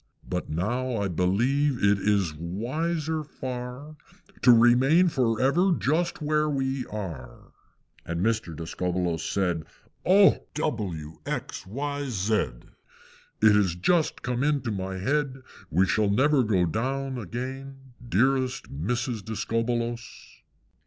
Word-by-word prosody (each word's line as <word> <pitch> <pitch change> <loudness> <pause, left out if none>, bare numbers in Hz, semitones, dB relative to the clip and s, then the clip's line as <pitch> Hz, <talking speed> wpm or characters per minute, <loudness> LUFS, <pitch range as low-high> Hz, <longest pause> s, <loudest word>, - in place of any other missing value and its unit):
But 90 0 -3
now 120 +11 -1
I 100 -1 0
believe 120 - +1
it 100 0 +4
is 100 -5 +1
wiser 155 - -2
far 130 +1 -7 0.4
To 125 - +7
remain 130 +9 +5
for 120 -7 +1
ever 175 +8 +3
just 160 +2 0
where 150 0 +1
we 135 -2 -1
are." 85 - -7 0.5
And 85 0 -4
Mr. 105 -6 0
Discobbolos 85 +1 -2
said, 90 -5 -1 0.4
"Oh! 195 +2 +6 0.2
W! 95 - -3
X! - - -4
Y! 145 +6 -3
Z! 105 -1 -1 1.1
It 110 -1 +7
has 95 -5 +2
just 160 - +1
come 125 +1 -1
into 140 -5 +1
my 95 -1 -4
head 135 +5 -1 0.3
We 90 +5 +3
shall 105 +2 +1
never 135 +7 +3
go 100 -6 +2
down 130 - -2
again, 130 +4 -7 0.2
Dearest 130 +3 +1
Mrs. 120 - -2
Discobbolos!" 115 +2 -2
120 Hz, 120 wpm, -26 LUFS, 95-135 Hz, 1.1 s, To